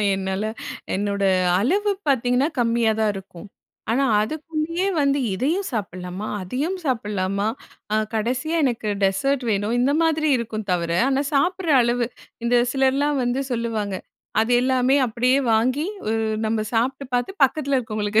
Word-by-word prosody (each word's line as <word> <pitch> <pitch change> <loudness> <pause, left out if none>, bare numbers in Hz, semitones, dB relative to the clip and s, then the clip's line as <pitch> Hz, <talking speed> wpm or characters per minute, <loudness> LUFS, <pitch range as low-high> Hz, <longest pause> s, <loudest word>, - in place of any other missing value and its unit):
என்னால 190 +1 -2 0.5
என்னோட 200 0 -1 0.4
அளவு 400 - +1 0.2
பார்த்தீங்கன்னா, 255 +1 +2
கம்மியாதான் 225 -2 +2
இருக்கும். 190 0 -10 0.4
ஆனா 270 +4 +2 0.2
அதுக்குள்ளேயே 315 - -2
வந்து 280 0 +2 0.2
"இதையும் 320 - 0
சாப்பிடலாமா? 185 -1 -4
அதையும் 285 - -2
சாப்பிடலாமா? 205 -6 -1 0.5
அ - - +3 0.2
கடைசியா 255 +9 -1
எனக்கு 235 -4 -1
டெசர்ட் 250 +8 +1
வேணும்." 210 +3 0
இந்த 270 +3 +3
மாதிரி 315 -1 +2
இருக்கும் 220 -3 -4
தவிர, 170 -1 0 0.2
ஆனா 275 +1 +1
சாப்பிடுற 345 +3 +1
அளவு, 240 0 +1 0.4
இந்த 245 +1 +3 0.2
சிலர்லாம் 275 +1 +2
வந்து 245 +2 0
சொல்லுவாங்க. 225 -4 -2 0.5
அது 225 +2 0
எல்லாமே 260 +1 +2
அப்படியே 250 +3 +2 0.2
வாங்கி, 255 +7 +2 0.2
உ - - +1 0.4
நம்ம 220 0 0
சாப்பிட்டு 260 +4 0
பார்த்து 245 +8 0
பக்கத்தில 275 +1 +2
இருக்கவங்களுக்கு 215 -2 0
245 Hz, 130 wpm, -23 LUFS, 215-275 Hz, 0.5 s, அ